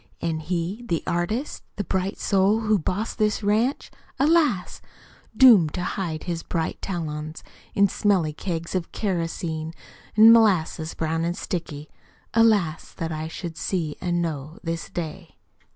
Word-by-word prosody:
An' 160 Hz, -1 st, -2 dB
he 175 Hz, +7 st, -3 dB
the 165 Hz, -2 st, -1 dB
artist? 215 Hz, -, -2 dB
The 205 Hz, -, -2 dB
bright 190 Hz, +1 st, -2 dB
soul 200 Hz, +2 st, +2 dB
who 215 Hz, -2 st, +2 dB
Bossed 195 Hz, +9 st, -3 dB
this 215 Hz, 0 st, +1 dB
ranch? 220 Hz, +7 st, +1 dB, 0.3 s
Alas! 290 Hz, -, +2 dB, 0.6 s
Doomed 215 Hz, -, +7 dB
to 180 Hz, -, -2 dB
hide 170 Hz, -5 st, -3 dB
his 170 Hz, -2 st, -3 dB
bright 165 Hz, -1 st, -3 dB
talons 155 Hz, -3 st, -4 dB, 0.3 s
In 200 Hz, 0 st, +5 dB
smelly 185 Hz, -6 st, +1 dB
kegs 170 Hz, 0 st, -4 dB
of 185 Hz, -3 st, -2 dB
kerosene 165 Hz, -4 st, -2 dB, 0.4 s
An' 225 Hz, +1 st, +10 dB
molasses 180 Hz, -8 st, +2 dB
brown 165 Hz, 0 st, -1 dB
an' 170 Hz, +1 st, -1 dB
sticky. 155 Hz, -5 st, -5 dB, 0.5 s
Alas, 210 Hz, -8 st, +2 dB
that 165 Hz, 0 st, -4 dB
I 155 Hz, 0 st, -3 dB
should 165 Hz, 0 st, -7 dB
see 165 Hz, -6 st, -2 dB
an' 175 Hz, -1 st, 0 dB
Know 155 Hz, 0 st, -4 dB
this 165 Hz, -1 st, -4 dB
Day. 170 Hz, 0 st, -6 dB
175 Hz, 140 wpm, -24 LUFS, 160-205 Hz, 0.6 s, An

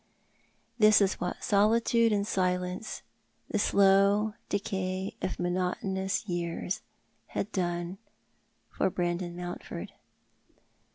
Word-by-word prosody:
This 215 Hz, -1 st, +7 dB
was 200 Hz, -2 st, +1 dB
what 180 Hz, 0 st, -3 dB
solitude 225 Hz, +2 st, +3 dB
and 200 Hz, -1 st, +1 dB
silence, 180 Hz, +1 st, -1 dB, 0.5 s
the 210 Hz, -, +1 dB
slow 200 Hz, +2 st, +4 dB, 0.2 s
decay 190 Hz, -1 st, -2 dB
of -, -, -2 dB
mono 180 Hz, +1 st, 0 dB
tonous 190 Hz, +1 st, -2 dB
years, 175 Hz, 0 st, -2 dB, 0.5 s
had 200 Hz, -, -3 dB
done 175 Hz, 0 st, -2 dB, 0.7 s
for -, -, +1 dB
Brandon 175 Hz, -1 st, -2 dB
Mountford. 175 Hz, 0 st, -6 dB
190 Hz, 100 wpm, -29 LUFS, 180-200 Hz, 0.7 s, This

